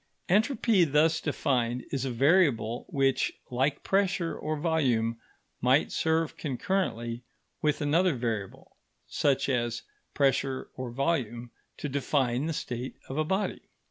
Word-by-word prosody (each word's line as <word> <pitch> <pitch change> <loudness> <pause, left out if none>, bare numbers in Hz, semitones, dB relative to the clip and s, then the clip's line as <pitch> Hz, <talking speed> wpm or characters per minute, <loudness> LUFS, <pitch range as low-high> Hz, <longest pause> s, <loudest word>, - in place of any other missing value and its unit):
Entropy, 215 0 +3
thus 160 +2 +3
defined, 125 -3 0
is 135 -2 -1
a - - -1
variable 130 - +2
which, 135 -1 +1 0.2
like 135 +3 0
pressure 190 -3 +1
or 155 0 -3
volume, 125 -8 +1 0.4
might 130 +4 +3
serve 160 0 0
concurrently 130 - -2 0.4
with 150 -1 +1
another 165 +3 +3
variable, 115 -5 -4 0.3
such 140 -2 +1
as 120 -3 -1 0.3
pressure 135 -1 +1
or 130 -1 -5
volume, 120 -3 -1 0.3
to - - -4
define 135 -1 0
the 165 - -1
state 125 -3 -4
of 135 - -4
a - - +3
body. 190 +6 -1
140 Hz, 125 wpm, -28 LUFS, 120-160 Hz, 0.4 s, Entropy